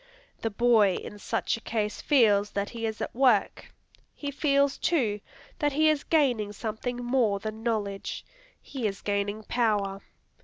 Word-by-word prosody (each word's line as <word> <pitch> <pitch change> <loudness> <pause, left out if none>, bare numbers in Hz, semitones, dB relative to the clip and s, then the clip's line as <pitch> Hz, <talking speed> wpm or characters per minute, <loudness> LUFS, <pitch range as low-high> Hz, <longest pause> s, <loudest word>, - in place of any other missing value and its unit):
The 225 - 0
boy 220 -3 +4
in 205 - -7
such - - -1
a - - -12
case 215 -2 -2
feels 210 -8 +4
that 200 0 -2
he 230 -1 -3
is 220 0 -5
at - - -3
work. 245 -5 +2 0.4
He 285 -1 -5
feels, 280 -1 +2
too, 225 - +1 0.4
that 295 -3 +1
he 310 +2 +4
is 300 -2 +1
gaining 245 -10 +1
something 225 +3 -4
more 240 -4 +1
than 215 +2 -6
knowledge. 210 -4 -3 0.3
He 255 -6 -4
is 195 -1 -5
gaining 205 +1 -2
power. 205 -5 0
225 Hz, 155 wpm, -27 LUFS, 205-260 Hz, 0.4 s, boy